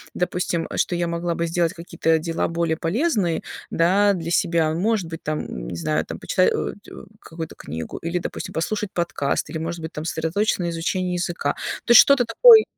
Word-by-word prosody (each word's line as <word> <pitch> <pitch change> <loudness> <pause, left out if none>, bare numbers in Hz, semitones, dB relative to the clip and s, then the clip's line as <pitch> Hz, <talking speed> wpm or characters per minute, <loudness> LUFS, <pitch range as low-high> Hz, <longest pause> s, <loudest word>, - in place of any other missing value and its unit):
допустим, 180 -1 -1
э, - - -5
что 175 - +1
я 175 0 0
могла 170 0 -2
бы 170 - -1
сделать 170 0 0
какие-то 165 -2 0
дела 165 +1 -1
более 165 -1 0
полезные, 195 - 0 0.3
да, 200 +4 +3
для 170 -2 -4
себя. 165 -2 +2
Может 195 -1 0
быть, 165 -1 -7
там, 150 - -4
не - - -5
знаю, 80 -1 -1
там - - -7
почитать, - - +2
аудио, 65 - -6 0.2
какую-то 160 -1 -8
книгу 80 +2 -6
или, 170 +2 -2
допустим, - - -6
послушать 205 +4 -2
подкаст, 170 -5 -1
или, 160 - -4
может 165 +1 -4
быть, 160 0 -6
там 150 +1 -5
сосредоточиться 170 +6 0
на 170 - -1
изучении 180 +2 -1
языка. 175 -5 -1 0.3
То - - +1
есть 235 - +11
что-то 280 -3 +4
такое 445 - +8
170 Hz, 190 wpm, -23 LUFS, 160-185 Hz, 0.3 s, есть